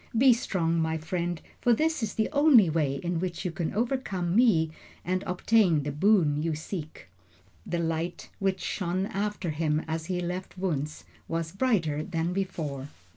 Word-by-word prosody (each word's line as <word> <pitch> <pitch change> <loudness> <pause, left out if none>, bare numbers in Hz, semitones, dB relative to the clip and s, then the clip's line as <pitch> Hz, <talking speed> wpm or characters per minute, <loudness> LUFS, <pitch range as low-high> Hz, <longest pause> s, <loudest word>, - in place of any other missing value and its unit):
Be 255 +1 +7
strong, 170 -7 0
my 160 0 0
friend, 170 +1 -2 0.2
for 240 -1 +4
this 315 +3 +1
is 220 -2 -2
the 220 - +1
only 280 - +6
way 150 -4 +1
in 175 +3 -2
which 180 +1 -3
you 180 - 0
can 170 -2 -2
overcome 205 -7 -1
me 205 -10 +4 0.3
and 185 +1 0
obtain 180 -4 +3
the 145 - -2
boon 150 -2 +3
you 160 -1 -1
seek." 155 - -7 0.6
The 175 - -1
light 165 +1 -2
which 195 -1 0
shone 185 0 -1
after 200 -3 -2
him 155 0 0
as 160 0 -3
he 180 -1 -1
left 180 +2 -4
Wunzh 155 -5 -2 0.2
was 165 -1 -2
brighter 185 - +1
than 170 0 -2
before. 155 -8 -3
175 Hz, 165 wpm, -28 LUFS, 160-195 Hz, 0.6 s, Be